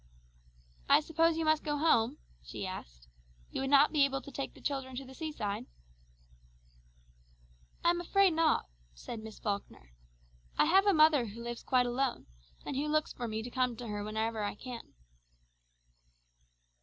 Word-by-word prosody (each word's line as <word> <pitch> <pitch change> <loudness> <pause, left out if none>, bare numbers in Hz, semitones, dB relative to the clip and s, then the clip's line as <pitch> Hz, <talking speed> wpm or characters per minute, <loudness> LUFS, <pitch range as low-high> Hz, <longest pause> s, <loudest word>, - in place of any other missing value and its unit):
"I - - +8
suppose 325 +1 +2
you 325 - 0
must 310 0 +3
go 295 -1 -1
home?" 285 -4 +3 0.3
she - - -6
asked. - - -8 0.4
"You - - -3
would 270 - -1
not 285 +1 +6
be 300 -3 +4
able 270 -1 +1
to 280 - -10
take 275 +1 -5
the - - -14
children 270 -2 -3
to 270 +2 -5
the 260 - -12
seaside?" 260 -10 -4 2.2
"I 340 - +5
am 345 0 -2
afraid 385 +1 +3
not," 320 0 +2 0.3
said 220 - -7
Miss 220 0 -9
Falkner. 200 - -5 0.7
"I - - +5
have 385 +5 +4
a - - +7
mother 305 -6 +5
who 225 +3 -8
lives 235 0 -5
quite 250 -1 +2
alone, 245 +1 -1 0.4
and - - -4
who 285 +3 -1
looks 310 0 0
for 240 - -4
me 220 0 -3
to 245 - -7
come 250 -2 0
to 235 0 -7
her 205 0 -3
whenever 220 +1 -2
I 205 - -2
can." 245 - -9
265 Hz, 170 wpm, -32 LUFS, 225-310 Hz, 2.2 s, I